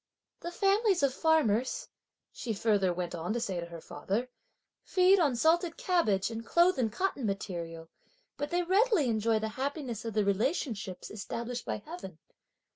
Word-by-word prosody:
"The 345 - -5
families 390 -1 +2
of 275 -2 +3
farmers," 260 -7 +2 0.4
she 230 - -4
further 200 -3 +2
went 175 0 -3
on 175 +4 -2
to 240 - -1
say 190 -6 -2
to 170 - -5
her 170 -1 -9
father, 205 +14 -3 0.5
"feed 375 +1 +4
on 290 -7 +3
salted 330 +6 +2
cabbage, 230 - +1
and 225 0 -5
clothe 345 +5 +3
in 230 -3 +2
cotton 325 - -2
material; 170 -5 -4 0.5
but 290 +1 -3
they 350 +1 +1
readily 390 - +3
enjoy 220 0 +2
the 220 0 -2
happiness 270 -5 -3
of 225 -2 -5
the 210 -2 +2
relationships 205 - -1
established 235 +3 -5
by 210 - -3
heaven! 305 - -8
235 Hz, 160 wpm, -30 LUFS, 200-335 Hz, 0.5 s, feed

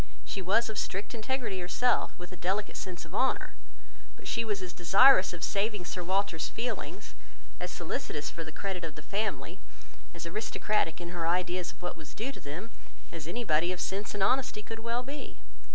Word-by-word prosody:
She 195 - -3
was 210 +6 +4
of 220 - -2
strict 195 +5 -2
integrity 235 -3 -1
herself, 240 +8 +2
with 180 0 -8
a - - -6
delicate 190 +4 0
sense 180 -2 -5
of - - -13
honour; - - +2 0.6
but - - -11
she 230 - +1
was 210 -3 0
as 180 -1 -5
desirous 195 +4 +7
of 175 -2 -6
saving 205 -2 +1
Sir 180 0 -3
Walter's 190 -2 +1
feelings, 245 +2 -3 0.5
as 180 - -2
solicitous 155 -3 -3
for 165 - -5
the 155 - -7
credit 190 0 -3
of 160 -2 -4
the 150 - -9
family, 210 +2 -1 0.6
as 170 - -5
aristocratic 210 -1 0
in 175 -1 -5
her 170 -2 -1
ideas 180 0 +1
of - - -21
what 180 - -2
was 155 -3 -10
due 245 +5 -1
to - - -11
them, 175 +11 -6 0.4
as 160 -2 -6
anybody 175 -5 +2
of 180 - -3
sense 200 +3 -1
and 200 - +2
honesty 250 -1 +2
could 225 +1 -5
well 230 +2 -1
be. 280 +3 -6
190 Hz, 190 wpm, -31 LUFS, 175-220 Hz, 0.6 s, desirous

